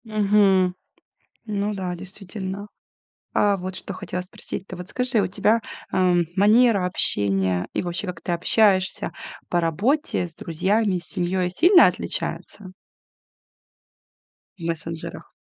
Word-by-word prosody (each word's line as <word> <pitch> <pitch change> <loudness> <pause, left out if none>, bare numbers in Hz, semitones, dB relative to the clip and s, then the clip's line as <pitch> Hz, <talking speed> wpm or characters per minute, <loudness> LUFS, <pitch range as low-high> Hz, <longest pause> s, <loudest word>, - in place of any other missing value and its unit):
Мгм. 200 -4 +3 0.7
Ну 210 -1 -2
да, 185 -2 -3
действительно. 190 +2 -7 0.7
А, 205 -1 +3
вот 185 0 -6
что 200 - -7
хотела 180 - -5
спросить. 180 +1 -7
Ты - - -8
вот 180 +1 -8
скажи, 250 -3 +1
у - - +1
тебя, 215 +4 +2 0.3
эм, 180 -2 +3
манера 210 0 +4
общения 95 - +2
и - - 0
вообще, 175 +3 -2
как 180 - -6
ты 175 - -3
общаешься 190 +2 +2 0.4
по 175 - +1
работе, 195 - 0
с 165 - -15
друзьями, 190 +5 0
с 175 - -10
семьёй 180 0 -1
сильно 350 - +6
отличается? 190 -3 -4 1.9
В - - -10
мессенджерах. 165 0 -5
185 Hz, 125 wpm, -23 LUFS, 175-210 Hz, 1.9 s, сильно